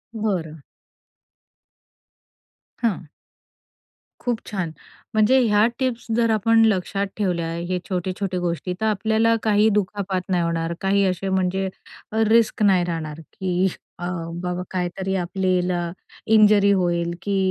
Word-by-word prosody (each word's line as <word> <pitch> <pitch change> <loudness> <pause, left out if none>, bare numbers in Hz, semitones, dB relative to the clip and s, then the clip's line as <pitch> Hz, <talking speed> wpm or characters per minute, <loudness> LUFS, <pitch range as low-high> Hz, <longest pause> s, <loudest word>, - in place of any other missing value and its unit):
बरं. 180 -8 -2 2.2
हां. 190 -8 -1 1.1
खूप 240 -2 -1
छान. 185 -6 -2 0.4
म्हणजे 220 +5 +4
ह्या 210 -3 +4
टिप्स 255 -3 -1
जर 230 -1 +2
आपण 225 +1 +4
लक्षात 200 -1 0
ठेवल्या 175 -5 -1 0.2
हे 185 -1 0
छोटे, 185 0 -1
छोटे 190 -2 -2
गोष्टी 175 +1 -2
तर - - +1
आपल्याला 220 +2 +2
काही 215 0 +4
दुखापात 195 -1 -3
नाही 175 -2 +2
होणार. 165 0 -1
काही 200 +1 +2
असे 190 +1 -1
म्हणजे 190 0 0 0.5
अ, 220 0 +2
रिस्क 220 -1 +3
नाही 190 -3 +4
राहणार 160 -3 -4
की 185 0 0 0.3
अ, 175 - -2 0.4
बाबा 180 0 -2
काहीतरी 185 +1 -2
आपल्याला 180 -2 0 0.4
इंजुरी 210 -1 +6
होईल 175 -3 +1
की 200 -1 -1
190 Hz, 125 wpm, -23 LUFS, 180-215 Hz, 2.2 s, इंजुरी